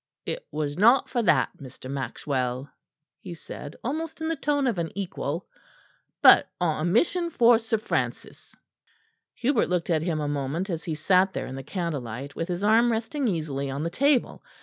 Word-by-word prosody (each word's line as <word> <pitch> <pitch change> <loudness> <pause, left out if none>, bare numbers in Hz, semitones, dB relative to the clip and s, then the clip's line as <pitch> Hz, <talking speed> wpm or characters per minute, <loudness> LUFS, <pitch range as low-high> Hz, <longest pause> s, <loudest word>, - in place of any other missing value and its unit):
"It - - -5
was 150 +1 -3
not 235 +6 +5
for 240 - 0
that, 150 - +3
Mr. 130 -1 -10
Maxwell," 130 -1 -3 0.5
he 180 -3 -8
said 150 -1 -9
almost 315 +6 -3
in 320 0 -2
the 330 - 0
tone 285 -1 0
of 230 -8 0
an 165 -2 -2
equal, 175 -4 -3 0.8
"but - - +8
on 160 -4 0
a 170 - +1
mission 340 - +2
for 240 -6 +5
Sir 225 -1 -1
Francis." 215 - -4 0.8
Hubert 250 -2 +1
looked 180 -1 0
at 160 -2 +2
him 165 -2 -1
a 150 - -2
moment 145 +7 -2
as 165 -1 -4
he 160 - -2
sat 185 +5 +3
there - - -3
in 130 - -7
the 135 - -5
candlelight, 140 - -4
with 165 - -3
his 180 +2 -3
arm 225 +3 +4
resting 235 +5 -1
easily 150 -7 -2
on 140 +3 -3
the 170 - -2
table. 275 +6 +1
175 Hz, 180 wpm, -26 LUFS, 145-235 Hz, 0.8 s, but